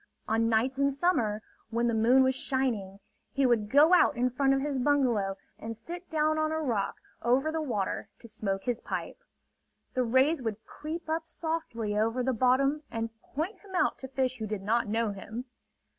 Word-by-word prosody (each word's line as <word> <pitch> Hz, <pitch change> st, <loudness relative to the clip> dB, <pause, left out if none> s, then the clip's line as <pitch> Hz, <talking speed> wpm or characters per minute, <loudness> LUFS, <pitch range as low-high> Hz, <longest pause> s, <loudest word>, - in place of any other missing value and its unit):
On 225 Hz, +1 st, +2 dB
nights 250 Hz, +4 st, +1 dB
in 280 Hz, 0 st, +3 dB
summer, 245 Hz, -9 st, +1 dB, 0.3 s
when 235 Hz, +1 st, 0 dB
the 235 Hz, -, +1 dB
moon 240 Hz, +4 st, +5 dB
was 260 Hz, 0 st, +3 dB
shining, 240 Hz, -8 st, -1 dB, 0.3 s
he 275 Hz, -1 st, +1 dB
would 230 Hz, -4 st, +2 dB
go 300 Hz, +7 st, +6 dB
out 325 Hz, -6 st, +5 dB
in 250 Hz, +1 st, +2 dB
front 270 Hz, +2 st, +2 dB
of 270 Hz, -, +3 dB
his 280 Hz, -2 st, -1 dB
bungalow 245 Hz, -8 st, +2 dB, 0.2 s
and 225 Hz, 0 st, -6 dB
sit 345 Hz, +10 st, -8 dB
down 310 Hz, 0 st, +1 dB
on 310 Hz, 0 st, +1 dB
a 315 Hz, -, 0 dB
rock 235 Hz, -10 st, -1 dB, 0.3 s
over 260 Hz, +6 st, +2 dB
the 320 Hz, 0 st, -1 dB
water 220 Hz, -10 st, -2 dB
to 235 Hz, -, -13 dB
smoke 200 Hz, -3 st, -3 dB
his 245 Hz, -2 st, -1 dB
pipe. -, -, -5 dB, 0.7 s
The 255 Hz, -, +1 dB
rays 260 Hz, +6 st, +3 dB
would 225 Hz, -2 st, -4 dB
creep 320 Hz, +3 st, -6 dB
up 320 Hz, +1 st, -2 dB
softly 315 Hz, -11 st, -3 dB
over 225 Hz, +4 st, +1 dB
the 260 Hz, +1 st, +1 dB
bottom 260 Hz, +5 st, +3 dB
and 225 Hz, 0 st, -3 dB
point 360 Hz, +8 st, -4 dB
him 390 Hz, -2 st, -10 dB
out -, -, +2 dB
to 265 Hz, -, -6 dB
fish 260 Hz, -1 st, -1 dB
who 220 Hz, -, -3 dB
did 210 Hz, -2 st, -4 dB
not 230 Hz, +3 st, +1 dB
know 225 Hz, 0 st, 0 dB
him. 220 Hz, +5 st, -7 dB
255 Hz, 190 wpm, -29 LUFS, 225-290 Hz, 0.7 s, go